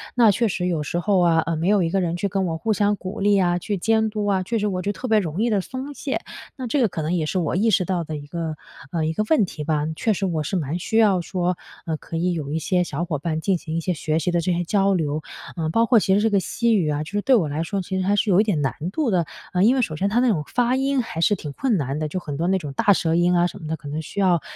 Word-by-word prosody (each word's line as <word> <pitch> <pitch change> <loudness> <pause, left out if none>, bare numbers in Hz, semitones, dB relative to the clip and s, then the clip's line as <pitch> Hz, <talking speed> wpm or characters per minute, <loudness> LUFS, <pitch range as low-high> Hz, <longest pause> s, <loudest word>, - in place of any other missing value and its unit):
那 235 -3 +6
确 210 +2 +2
实 180 -1 -2
有 165 -4 -1
时 170 +4 -2
候 195 0 +2
啊， 170 -2 +4
呃， 165 - -1
没 165 +4 0
有 205 -2 +4
一 165 - 0
个 195 +3 +1
人 170 -1 -1
去 200 - -1
跟 195 -1 -1
我 165 -1 -2
互 220 +7 0
相 205 +1 +1
鼓 195 +3 -6
励 205 0 +4
啊， 175 -1 +2
去 205 +3 -3
监 220 +3 +2
督 210 -1 -3
啊， 195 -2 +1
确 230 +4 -1
实 210 - 0
我 185 -2 -2
觉 200 - -1
得 - - -11
特 255 - -3
别 220 -2 +4
容 175 0 -3
易 235 - +2
地 205 -3 +2
松 265 +7 -6
懈， 275 0 -3 0.4
那 260 -2 -4
这 270 +3 +1
个 230 - +3
可 160 - -4
能 155 +3 -1
也 165 -3 0
是 185 +5 -1
我 165 -1 -1
意 220 +5 +2
识 185 -3 +2
到 175 -1 -1
的 155 -1 -5
一 145 0 -9
个， 160 0 -4 0.3
呃 160 -2 -1
一 160 - -1
个 215 - 0
问 250 -10 +4
题 155 -4 -7
吧。 150 -1 0
确 220 - 0
实 195 0 -2
我 165 -4 -1
是 150 +6 -3
蛮 160 0 -2
需 220 - -1
要 205 -5 +4
说， 180 +1 -1 0.3
呃， 160 - -1
可 165 - -6
以 175 +2 +1
有 150 -4 -4
一 155 - -1
些 180 +2 +1
小 175 0 -3
伙 150 -4 -3
伴 155 +1 -2
进 190 +3 +1
行 160 -1 -6
一 - - +1
些 180 +2 -1
学 155 0 -1
习 175 +2 0
的 175 - +1
这 180 - 0
些 175 0 0
交 195 +2 +2
流， 155 -3 -1 0.3
呃， 160 -2 -2
包 230 +8 +3
括 230 -1 +5
其 190 -1 +2
实 - - +3
这 225 - +3
个 200 - +4
西 230 +4 +1
语 170 -7 +1
啊， 150 0 -1
就 155 - -10
是 205 - -1
对 265 +4 +4
我 185 -10 +2
来 150 +2 -2
说 195 +3 -2
其 190 +1 -3
实 185 - -2
还 205 - +3
是 205 - +1
有 185 - +6
一 - - +3
点 200 -8 0
难 135 - 0 0.2
度 260 -1 0
的， 175 -3 +2 0.3
呃， 180 0 +3
因 240 +5 +5
为 260 - +2
首 155 - -3
先 195 +6 0
它 225 +4 +2
那 255 - +3
种 160 -9 +1
发 245 +1 +1
音 270 -1 +1
还 165 -7 -5
是 205 - +4
挺 150 -6 -7
困 240 - 0
难 140 -1 -2
的， 155 - -1
就 170 +5 -3
很 150 -5 -6
多 165 +4 -1
那 190 +1 +3
种 150 -6 -6
大 200 +9 +4
舌 165 -3 0
音 175 +1 +3
啊 175 - +4
什 175 - -5
么 155 - -7
的， 160 +1 -2
可 145 - -11
能 150 +2 -3
需 160 - -7
要 180 -4 +3
180 Hz, 350 characters per minute, -23 LUFS, 160-205 Hz, 0.4 s, 那